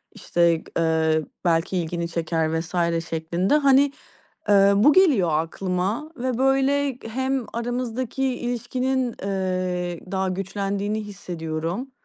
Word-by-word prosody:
işte, 170 -1 +1
eee, 160 -1 +2 0.2
"Belki 170 +2 +1
ilgini 170 0 -2
çeker." 160 -1 -1
vs. 165 +2 -7 0.3
şeklinde. 170 - +1
Hani, 280 -1 +4 0.6
eee, 200 0 +6
bu 230 +9 +6
geliyor 285 - +4
aklıma 185 - -2
ve 255 -1 -2
böyle 270 0 +2
hem 260 +1 -1
aramızdaki 245 +2 -3
ilişkinin, 250 0 -1
eee, 185 -3 -2
daha 190 -1 0
güçlendiğini 200 +3 -2
hissediyorum. 175 +3 -5
195 Hz, 105 wpm, -24 LUFS, 170-255 Hz, 0.6 s, eee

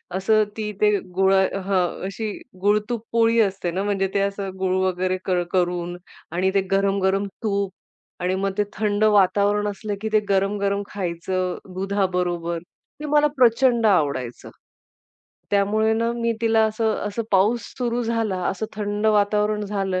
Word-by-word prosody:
असं 215 +3 +3
ती 210 -1 -3
ते 210 0 +5 0.2
गुळ 190 0 +4
अ, 190 0 +2
हं, 185 -3 0
अशी 210 +2 -4 0.3
गुळ-तूप 210 +3 +1
पोळी 230 0 +3
असते 190 -4 -1
ना 190 +3 -2
म्हणजे 195 -1 0
ते 200 - +2
असं 200 0 -2
गुळ 185 -1 +1
वगैरे 185 0 0
क 185 - -1 0.2
करून 175 -1 -1 0.3
आणि 185 +2 +1
ते 195 - +3
गरम-गरम 195 0 +2 0.2
तूप 200 -2 0 0.5
आणि 180 +1 0
मग 195 +1 -1
ते 210 - +3
थंड 210 0 0
वातावरण 205 0 +3
असलं, 205 0 -4
की 220 - -2
ते 215 - +6
गरम-गरम 200 +1 +1
खायचं 185 -1 -2 0.2
दुधाबरोबर, 180 -3 -1 0.4
ते 300 - -6
मला 295 0 +4
प्रचंड 240 -1 +4
आवडायचं. 140 - 0 1.0
त्यामुळे 210 +2 +2
ना 230 +1 0
मी 235 -1 0
तिला 225 -1 +3
असं 220 0 0
असं 210 +3 -3
पाऊस 205 +4 +3 0.2
सुरु 245 -1 -1
झाला, 225 -4 -1
असं 215 +3 -3
थंड 205 +1 -1
वातावरण 210 0 +2
झालं, 195 -2 -1
200 Hz, 150 wpm, -23 LUFS, 190-215 Hz, 1.0 s, ते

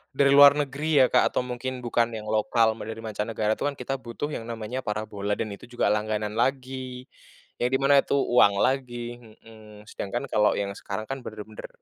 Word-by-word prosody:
dari 140 0 +4
luar 140 0 +9
negeri 145 0 +2
ya - - +5
Kak - - +4
atau - - +1
mungkin 125 +1 -5
bukan 120 0 +1
yang 110 - -6
lokal 110 +1 +2
mau 105 - -7
dari 110 0 -6
mancanegara, 110 0 -2
itu - - -2
kan 145 - -3
kita 135 +1 -4
butuh 130 +4 -5
yang 115 -5 -5
namanya 115 +2 -4
parabola 105 -1 -3
dan 110 0 -4
itu 100 +4 -10
juga 120 -4 0
langganan 105 0 -1
lagi, 130 0 -2 0.6
yang 120 - +2
di - - +2
mana 140 +1 +5
itu 140 - 0
uang 120 -7 +4
lagi, 120 -2 -2
mhm, 110 -2 -15
sedangkan 120 +6 -4
kalau 105 -1 +3
yang 100 -1 -2
sekarang 100 +2 -5
kan 135 0 -4
bener-bener 110 -1 -8
120 Hz, 195 wpm, -26 LUFS, 110-130 Hz, 0.6 s, luar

